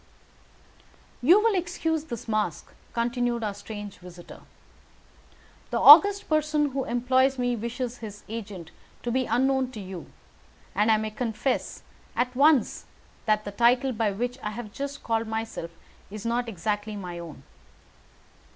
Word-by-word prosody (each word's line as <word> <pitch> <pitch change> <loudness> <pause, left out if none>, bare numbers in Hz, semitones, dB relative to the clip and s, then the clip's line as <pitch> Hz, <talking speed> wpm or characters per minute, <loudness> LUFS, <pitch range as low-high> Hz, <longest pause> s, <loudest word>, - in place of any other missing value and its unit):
"You 340 +11 +6
will 450 0 +3
excuse 330 -4 -1
this 235 -7 -7
mask," 215 -1 -2 0.2
continued 240 0 -1
our 210 -2 -1
strange 205 0 -8
visitor. 175 -1 -12 1.3
"The - - -1
august 400 +7 +8
person 305 -1 +1
who 270 0 -2
employs 260 +3 +2
me 245 -1 0
wishes 240 +2 -4
his 210 -2 -9
agent 200 -7 -7 0.3
to 240 - -2
be 255 +1 0
unknown 265 +1 +1
to 215 - -7
you, 185 -4 -8 0.7
and 210 +3 +2
I 220 - +5
may 215 0 -3
confess 235 +3 -2 0.3
at 250 +2 -1
once 280 -3 +3 0.4
that 215 0 +2
the 205 - -4
title 245 +4 +3
by 220 -2 0
which 245 +5 -3
I 210 - -3
have 215 -1 -7
just 280 +1 -5
called 225 0 0
myself 220 -6 -4 0.4
is 215 +2 -8
not 235 +1 0
exactly 210 +2 -3
my 180 -4 -6
own." 165 -5 -10
235 Hz, 140 wpm, -26 LUFS, 210-260 Hz, 1.3 s, august